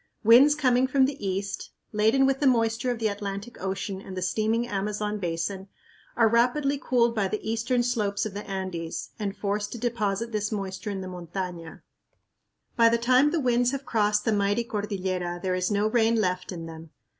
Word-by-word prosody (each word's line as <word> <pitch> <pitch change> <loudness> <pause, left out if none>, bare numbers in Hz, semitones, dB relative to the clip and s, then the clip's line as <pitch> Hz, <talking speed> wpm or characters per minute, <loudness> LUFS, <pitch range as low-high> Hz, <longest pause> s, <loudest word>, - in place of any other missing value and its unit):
Winds 250 +7 +7
coming 255 -3 +3
from 265 0 +4
the 280 -4 -4
east, 195 +1 -3 0.2
laden 220 +6 +3
with 270 0 +1
the 285 - +3
moisture 230 0 +2
of 245 - -1
the 225 -1 0
Atlantic 200 +2 -5
Ocean 190 0 -3
and 190 -1 -9
the - - -2
steaming 220 +5 0
Amazon 210 0 -2
Basin, 180 +2 -3 0.5
are 230 -2 +5
rapidly 260 +5 +2
cooled 235 -2 +2
by 210 -4 0
the 215 +2 -2
eastern 230 +2 0
slopes 215 -5 0
of 215 - -5
the 205 +1 -5
Andes 185 -4 -4
and 200 -2 -3
forced 205 0 -2
to - - -5
deposit 230 -2 -1
this 210 -1 -2
moisture 195 0 -4
in 195 -2 -4
the 185 - -6
montaña. 175 -1 -6 0.9
By 230 -1 +6
the 235 - +2
time 255 +4 +4
the 330 +2 0
winds 245 -1 +2
have 275 0 -4
crossed 210 -2 +1
the 225 - +2
mighty 205 +2 +1
cordillera 190 -5 -3
there 185 -1 0
is 185 0 0
no 205 0 +1
rain 225 +1 +3
left 185 -4 -1
in 165 -2 -6
them. 160 0 -10
210 Hz, 190 wpm, -26 LUFS, 195-235 Hz, 0.9 s, Winds